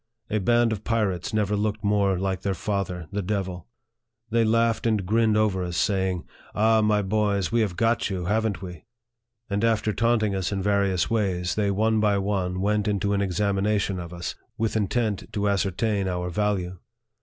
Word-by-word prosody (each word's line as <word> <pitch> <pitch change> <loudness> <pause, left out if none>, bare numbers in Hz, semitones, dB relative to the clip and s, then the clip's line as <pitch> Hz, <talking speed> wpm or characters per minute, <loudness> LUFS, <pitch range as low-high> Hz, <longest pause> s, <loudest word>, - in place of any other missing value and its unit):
A 110 - +1
band 120 +3 +3
of 110 -1 -3
pirates 105 -6 -1
never 105 -2 +1
looked 105 0 -1
more 100 -2 +2
like 95 -1 -2
their 100 -1 -1
father, 90 -4 -3
the 105 - -2
devil. 95 -3 -3 0.6
They 115 0 +3
laughed 115 +1 +2
and 105 -4 +1
grinned 110 +2 +2
over 100 -4 +1
us, 90 -1 -3
saying, 95 -3 0 0.3
"Ah, 110 +2 +4
my 105 -1 +2
boys! 100 -1 0
we 115 0 +2
have 100 -5 -1
got 115 +2 +1
you, 90 -3 -3
haven't 110 +1 0
we? 90 -4 -9 0.3
" 115 0 -54
And 100 +2 0
after 110 -2 +2
taunting 115 -2 +2
us 95 -1 -2
in 100 - -1
various 100 -1 +1
ways, 95 -6 0
they 105 -2 0
one 110 +3 +2
by 105 -1 +3
one 95 -2 -1
went 105 +1 +1
into 100 -1 0
an 100 - +1
examination 100 +1 0
of 85 -1 -7
us, 90 0 -5 0.2
with 115 0 -1
intent 110 0 -1
to 105 -1 0
ascertain 100 +1 0
our 90 -1 -2
value. 95 -2 -1
100 Hz, 180 wpm, -25 LUFS, 95-110 Hz, 0.6 s, Ah